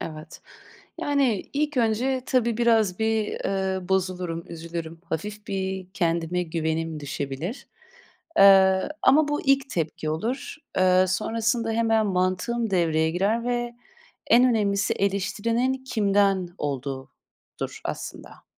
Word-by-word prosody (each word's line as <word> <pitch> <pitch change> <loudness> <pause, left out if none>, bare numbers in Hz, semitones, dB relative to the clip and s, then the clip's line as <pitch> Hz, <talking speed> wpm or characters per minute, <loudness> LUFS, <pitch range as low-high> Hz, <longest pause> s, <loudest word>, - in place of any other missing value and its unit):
evet. 155 0 -8 0.6
Yani, 270 -9 0
ilk 295 0 -1
önce, 250 +3 +1
tabii, 235 -3 +1
biraz 225 -6 +2
bir, 220 -1 +1 0.2
eee, 190 -2 -1
bozulurum, 180 -3 -1
üzülürüm. 165 0 -7
Hafif 205 +6 -5
bir 190 -1 -3
kendime 170 -1 0
güvenim 160 -1 -2
düşebilir. 145 - -5 0.7
Eee, 190 -1 +6
ama 295 +3 +5
bu 295 - -1
ilk 275 0 +3
tepki 155 -2 -2
olur. 230 - -3 0.2
Eee, 185 0 +5
sonrasında 225 +4 0
hemen 225 -1 +2
mantığım 185 +5 0
devreye 160 -3 +2
girer 200 +7 0
ve 240 -1 -2 0.5
en 240 +2 +6
önemlisi 205 -5 +2
eleştirinin 230 +6 0
kimden 200 -5 +2
olduğudur, 135 -2 -6
aslında. - - -7
195 Hz, 110 wpm, -25 LUFS, 170-230 Hz, 0.7 s, Eee